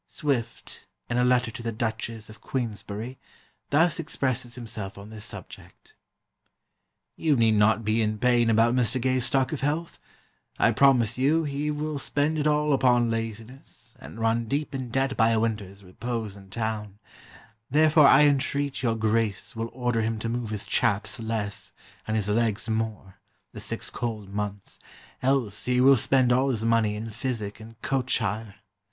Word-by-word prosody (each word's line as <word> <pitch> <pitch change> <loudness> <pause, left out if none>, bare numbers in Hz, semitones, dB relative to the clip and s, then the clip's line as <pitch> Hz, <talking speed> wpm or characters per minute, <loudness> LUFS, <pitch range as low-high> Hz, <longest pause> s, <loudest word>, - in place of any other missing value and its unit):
Swift, 120 -6 -3 0.2
in 120 - +1
a - - +3
letter 125 -1 +2
to 120 - -8
the 115 0 -3
Duchess 110 0 -3
of 110 +1 -14
Queensberry, 115 0 -4 0.5
thus 165 +4 +3
expresses 130 -6 -2
himself 110 -5 -7
on 100 +2 -10
this 105 -1 -6
subject: - - -11 1.2
'You 155 -3 +2
need 115 -3 +4
not 110 +1 +3
be 110 +2 +2
in 110 0 0
pain 120 0 +3
about 115 +1 +4
Mr. 125 0 +2
Gay's 130 0 +1
stock 135 +3 +1
of 145 - -4
health; 155 +4 -2 0.6
I - - +4
promise 125 -4 +3
you 155 +5 +3
he 145 0 -2
will 150 0 -3
spend 145 +3 0
it 150 - +1
all 150 0 +2
upon 120 -3 +3
laziness, 115 +3 -6
and 115 - -10
run 115 +1 +1
deep 145 +5 -2
in 130 -2 -4
debt 135 +2 0
by 115 0 +4
a 115 -1 +2
winter's 105 -3 -3
repose 110 +2 -5
in 100 -1 -14
town; 105 -1 -4 0.7
therefore 155 +1 +5
I 135 +2 +7
entreat 140 -1 +1
your 115 -3 +1
Grace 110 -2 0
will 115 +1 -3
order 120 -2 -1
him 110 0 -1
to 115 - -2
move 120 -1 -3
his 105 -1 -4
chaps 105 +3 0
less, 110 -2 -4 0.3
and 110 - -1
his 105 -2 -1
legs 110 0 0
more, 110 -4 -3 0.3
the - - -8
six - - -3
cold 110 -5 -5
months, 100 -1 -5 0.4
else 125 -6 0
he 125 0 +2
will 135 +2 +7
spend 130 0 +3
all 130 +2 +2
his 115 -4 -1
money 115 -2 +2
in 110 +1 -5
physic 110 -3 -4
and 115 +1 -13
coach 135 -1 +1
hire. 110 -1 -3
115 Hz, 170 wpm, -26 LUFS, 110-130 Hz, 1.2 s, I